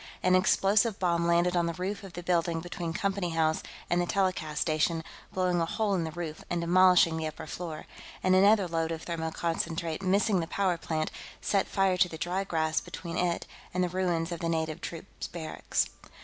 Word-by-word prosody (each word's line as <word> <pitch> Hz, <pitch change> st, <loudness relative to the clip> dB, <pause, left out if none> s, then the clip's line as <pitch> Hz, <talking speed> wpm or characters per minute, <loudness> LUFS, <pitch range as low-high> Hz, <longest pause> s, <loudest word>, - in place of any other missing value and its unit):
An 185 Hz, -, +4 dB
explosive 200 Hz, +3 st, +3 dB
bomb 170 Hz, -2 st, +1 dB
landed 175 Hz, +1 st, +3 dB
on 170 Hz, -1 st, +2 dB
the 170 Hz, -, -3 dB
roof 190 Hz, +4 st, -3 dB
of 195 Hz, -3 st, -10 dB
the 175 Hz, -, -6 dB
building 170 Hz, -1 st, +1 dB
between 175 Hz, 0 st, -4 dB
Company 195 Hz, +1 st, -1 dB
House 160 Hz, -1 st, +2 dB, 0.3 s
and 175 Hz, +1 st, +2 dB
the 175 Hz, -, -1 dB
telecast 185 Hz, -6 st, 0 dB
station, 160 Hz, +1 st, +1 dB, 0.3 s
blowing 180 Hz, -2 st, +1 dB
a -, -, +2 dB
hole 215 Hz, +1 st, 0 dB
in 175 Hz, -4 st, 0 dB
the 160 Hz, -, -4 dB
roof 160 Hz, -1 st, -6 dB
and 175 Hz, -, 0 dB
demolishing 175 Hz, -1 st, +5 dB
the 160 Hz, -1 st, -2 dB
upper 155 Hz, -, -7 dB
floor. 160 Hz, -1 st, -6 dB, 0.4 s
And 185 Hz, -, +4 dB
another 200 Hz, 0 st, +5 dB
load 165 Hz, -1 st, -1 dB
of 160 Hz, -1 st, -5 dB
thermoconcentrate, 165 Hz, 0 st, -2 dB
missing 195 Hz, +1 st, +2 dB
the 165 Hz, -, -2 dB
power 185 Hz, -2 st, +1 dB
plant, 155 Hz, -1 st, -2 dB, 0.3 s
set 200 Hz, -2 st, +1 dB
fire 195 Hz, -2 st, +2 dB
to 180 Hz, -, +4 dB
the 160 Hz, -, -7 dB
dry 180 Hz, +4 st, -1 dB
grass 160 Hz, -4 st, 0 dB
between 170 Hz, -2 st, -7 dB
it 175 Hz, -1 st, 0 dB, 0.3 s
and 180 Hz, -, +2 dB
the 180 Hz, -, 0 dB
ruins 175 Hz, -2 st, 0 dB
of 170 Hz, -, -3 dB
the 170 Hz, -2 st, -1 dB
native 160 Hz, -1 st, -1 dB
troops 170 Hz, +3 st, -7 dB
barracks. 160 Hz, -2 st, -2 dB
175 Hz, 195 wpm, -29 LUFS, 165-185 Hz, 0.4 s, demolishing